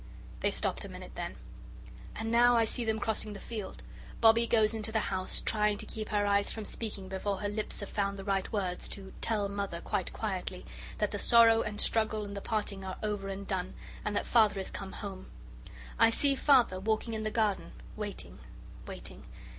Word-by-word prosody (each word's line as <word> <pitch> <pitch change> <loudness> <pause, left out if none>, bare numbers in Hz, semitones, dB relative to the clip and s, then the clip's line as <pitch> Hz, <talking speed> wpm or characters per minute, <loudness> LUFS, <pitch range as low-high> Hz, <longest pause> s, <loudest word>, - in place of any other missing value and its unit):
They - - +2
stopped - - 0
a - - -7
minute - - -9
then. - - -5 0.8
And 225 +1 -3
now 240 +1 +6
I 230 - +4
see 240 +2 -1
them 220 -1 0
crossing 215 -1 -1
the 200 - -8
field. 215 -4 -6 0.4
Bobbie 230 +1 +6
goes 220 -2 +4
into 220 0 -3
the 220 -2 0
house, 185 0 -1
trying 210 -1 +2
to - - -5
keep 215 -1 -6
her 205 -1 +2
eyes 200 0 +3
from 220 -2 -5
speaking 205 -4 -5
before 190 +1 -2
her 205 - -2
lips 210 +1 -3
have 200 - -5
found 200 -1 -1
the 195 - -6
right 195 -1 0
words 185 -5 -2
to 195 -1 -8
"tell 210 -3 +1
Mother 200 -3 -3
quite - - -2
quietly" - - -4 0.3
that - - 0
the - - -3
sorrow 230 -1 +7
and 210 0 -3
the - - +3
struggle 220 -1 +1
and 200 0 -7
the 200 - -4
parting 205 -3 -2
are 190 -1 -5
over 205 -2 -2
and 195 +1 -5
done, 185 -1 -2 0.3
and 210 -1 -1
that - - 0
Father 220 -3 +5
has 190 -1 -3
come 195 -1 -6
home. 195 -3 -7 0.7
I - - +8
see 280 +5 +3
Father 260 -9 +4
walking 220 +3 0
in 220 - -2
the 215 - -1
garden, 215 - 0 0.2
waiting - - -5 0.5
waiting. - - -8
210 Hz, 200 wpm, -31 LUFS, 195-220 Hz, 0.8 s, I